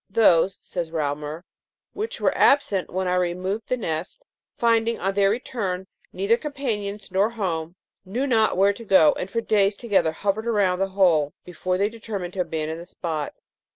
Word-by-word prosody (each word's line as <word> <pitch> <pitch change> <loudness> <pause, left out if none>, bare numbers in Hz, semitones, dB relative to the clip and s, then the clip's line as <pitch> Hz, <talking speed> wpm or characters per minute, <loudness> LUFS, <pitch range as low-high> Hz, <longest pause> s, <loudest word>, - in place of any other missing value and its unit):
' - - -55
Those,' 185 0 +5
says 175 -3 -4
Reaumur, 150 +1 -3 0.3
' - - -69
which 435 +2 -4
were - - +1
absent 210 -10 +3
when 185 +1 -2
I 180 - +1
removed 180 +4 -1
the 255 - 0
nest, 175 - -4 0.3
finding, 230 0 +2
on 195 +1 0
their 195 0 +3
return, 200 -5 -2 0.3
neither 200 +5 +2
companions 215 -9 -4
nor 195 +3 +3
home, 175 -7 -3 0.3
knew 225 +9 -2
not 225 -7 +2
where 200 +1 +4
to 230 - -10
go, 190 -7 +5
and 185 - -5
for 230 +4 -1
days 205 -2 +2
together 195 -7 +1
hovered 205 +7 -2
around 200 -5 +2
the 195 - +1
hole 160 -7 +4
before 180 +1 -2
they 200 +2 +2
determined 210 -5 -6
to 190 - -1
abandon 160 -1 -3
the 170 - -10
spot.' 155 -4 -4
195 Hz, 180 wpm, -24 LUFS, 175-220 Hz, 0.3 s, Those